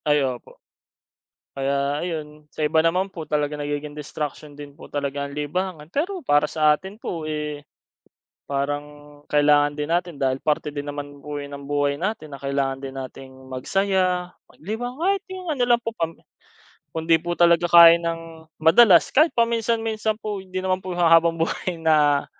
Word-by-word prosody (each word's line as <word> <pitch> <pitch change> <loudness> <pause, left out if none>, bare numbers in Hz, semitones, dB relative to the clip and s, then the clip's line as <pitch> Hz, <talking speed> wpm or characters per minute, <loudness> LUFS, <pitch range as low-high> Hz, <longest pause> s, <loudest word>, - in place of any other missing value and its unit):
Ay 150 -2 +3
opo. 125 -2 -6 1.0
Kaya 140 +1 0
ayon, 150 -3 -6
sa - - -4
iba 150 +2 +2
naman 185 +4 +1
po, 160 -4 -7
talagang 150 0 -1
nagiging 145 0 -4
destruction 150 0 -6
din 145 -1 -10
po - - -11
talaga 140 0 -3
ang 140 - -9
libangan. 155 +1 -3
Pero 355 +5 -2
para 145 - +3
sa 155 0 +3
atin 190 +2 -10
po, 165 -3 -4
eh, 150 -1 -4 0.8
parang 145 +1 -1 0.5
kailangan 145 0 +4
din 150 0 -2
natin 175 0 0
dahil 130 -1 0
parte 150 -1 0
din 145 - -3
naman 145 -1 -7
po 150 0 -5
yan 140 0 -8
ng 140 - -11
buhay 145 -1 +1
natin 185 -4 -3
na 140 - -11
kailangan 140 -1 -1
din 135 0 -7
natin 130 0 -8 0.2
magsaya, 185 +5 0 0.2
maglibang, 240 - -6
kahit 390 +2 +1
yung 370 -1 -7
ano 270 -5 +1
lang 240 -1 +4
po 230 - -2
pam 165 0 -2 0.8
kung 160 0 -5
'di 165 -1 +6
po 175 - -2
talaga 170 0 +5
kaya 170 -1 +10
nang 165 -1 -5
madalas, 170 +3 +6
kahit 310 +4 +5
paminsan-minsan 225 -2 0
po. 210 -2 -4
Hindi 185 0 -7
naman 185 0 -1
po 185 - -6
yung 175 0 -2
ha - - +6
habang-buhay 165 +1 -1
na 150 -3 +3
155 Hz, 170 wpm, -23 LUFS, 145-185 Hz, 1.0 s, kaya